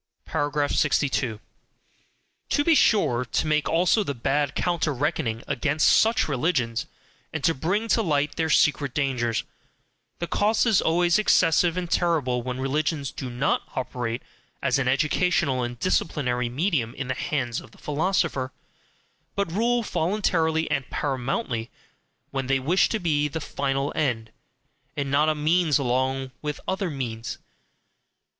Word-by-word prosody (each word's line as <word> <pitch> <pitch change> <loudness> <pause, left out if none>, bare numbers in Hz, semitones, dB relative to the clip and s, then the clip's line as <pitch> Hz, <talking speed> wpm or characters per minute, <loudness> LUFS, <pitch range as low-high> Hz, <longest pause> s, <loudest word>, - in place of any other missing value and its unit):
62. 145 -5 0 1.1
To 290 - +2
be 330 - +4
sure 195 - +3
to 120 +6 -1
make 150 -1 +1
also 180 +6 +3
the 140 -7 -3
bad 140 +4 0
counter 170 -3 0
reckoning 135 -4 -1
against 145 +2 +2
such 225 +1 +3
religions, 125 -5 0 0.4
and 160 -3 -4
to 165 - +4
bring 185 +11 -1
to 225 - +3
light 150 -6 0
their 160 -1 0
secret 145 -3 +2
dangers 125 -5 0 0.7
the 170 - -3
cost 210 +7 +2
is 220 -5 +4
always 175 +3 +3
excessive 175 -3 +3
and 175 -2 -3
terrible 145 -8 +1
when 125 +1 -4
religions 145 +1 -1
do 130 - -6
NOT 125 +4 0
operate 125 -2 -3 0.4
as - - +1
an 135 - 0
educational 145 0 +1
and 120 0 -4
disciplinary 125 -6 0
medium 135 - -1
in 130 -1 -4
the 130 - 0
hands 125 -3 -2
of - - -14
the - - -20
philosopher, 150 -4 -1 0.8
but 200 -4 -1
rule 235 +5 +1
voluntarily 165 -4 +1
and 135 -2 -1
PARAMOUNTLY, 130 - -2 0.6
when 135 -1 -2
they 135 0 +3
wish 160 +9 +2
to 220 - 0
be 150 -6 +1
the 150 +2 -4
final 140 -1 -2
end, 120 -7 -1 0.7
and 140 -1 -2
not 150 +2 +3
a 155 - +1
means 155 +1 +2
along 130 0 -1
with 150 -1 -4
other 190 -1 -1
means. 120 -6 -4
145 Hz, 140 wpm, -25 LUFS, 130-170 Hz, 1.1 s, be